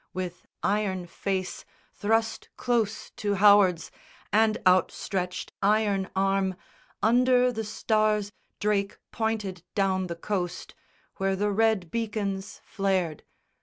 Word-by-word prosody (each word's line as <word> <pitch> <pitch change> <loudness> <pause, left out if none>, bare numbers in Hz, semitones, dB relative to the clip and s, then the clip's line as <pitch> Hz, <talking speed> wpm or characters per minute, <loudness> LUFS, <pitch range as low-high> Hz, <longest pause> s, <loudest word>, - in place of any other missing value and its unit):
With 180 -1 -5 0.2
iron 195 -3 0
face 185 +1 -3 0.3
Thrust 225 +2 0
close 225 -3 -1
to 205 -1 0
Howard's, 195 -4 +5 0.4
and 220 0 +4
outstretched 185 0 +1
iron 200 -2 +2
arm, 195 -1 +1 0.5
Under 250 +2 +4
the 220 -2 -3
stars 215 -1 +1 0.3
Drake 205 -1 0
pointed 215 -5 -2
down 190 -2 +1
the 170 - -4
coast 180 0 -3 0.4
Where 195 0 +1
the 205 +2 0
red 210 -4 +1
beacons 210 -3 -3
flared. 190 -6 -1
200 Hz, 105 wpm, -27 LUFS, 190-215 Hz, 0.5 s, Howard's